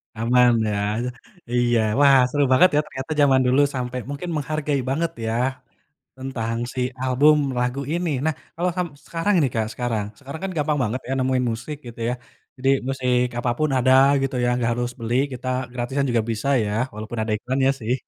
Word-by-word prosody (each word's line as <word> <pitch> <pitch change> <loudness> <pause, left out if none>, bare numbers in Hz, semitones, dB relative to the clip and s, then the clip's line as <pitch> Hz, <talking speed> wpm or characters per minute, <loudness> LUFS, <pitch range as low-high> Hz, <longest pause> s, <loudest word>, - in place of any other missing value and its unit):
Aman, 120 +2 +4 0.2
ya? 105 - -1 0.7
Iya, 120 -1 +2 0.2
wah 140 -1 +7
seru 145 +2 +1
banget 130 +8 +6
ya, - - +5
ternyata 130 +2 -7
jaman 135 -2 +5
dulu, 130 +3 +4
sampai 125 0 -3
mungkin 145 +5 -5
menghargai 150 -1 -1
banget 160 +5 0
ya, 110 - -1 0.8
tentang 120 -4 -3 0.2
si 130 - -2 0.2
album 135 +4 +4 0.2
lagu 125 +2 -1
ini. 170 0 -1
Nah, 160 -1 +1 0.2
kalau 180 +2 0
sam 180 -1 0 0.2
sekarang 170 +5 0
ini 145 -5 +3
Kak, 110 -1 0
sekarang 115 -3 -2
sekarang 140 +3 -8
kan, 195 - -2
gampang 150 0 0
banget 125 +2 -2
ya, 135 - -2
nemuin 130 0 +1
musik, 120 +7 -6
gitu 120 -1 -9
ya. - - -1 0.4
Jadi, 135 +1 -1 0.2
musik 125 -2 +1
apapun 125 +6 0
ada 130 0 +3 0.3
gitu 135 -1 -1
ya, - - +2
nggak 120 -1 0
harus 120 0 -2
beli, 115 0 -3 0.2
kita 130 0 -5 0.2
gratisan 125 +3 -1
juga 120 -2 +2
bisa 115 +4 -2 0.2
ya, 105 - -2 0.2
walaupun 110 +2 -6
ada 110 0 -2
iklannya 130 +4 +1
sih. 115 +2 0
130 Hz, 180 wpm, -23 LUFS, 120-145 Hz, 0.8 s, wah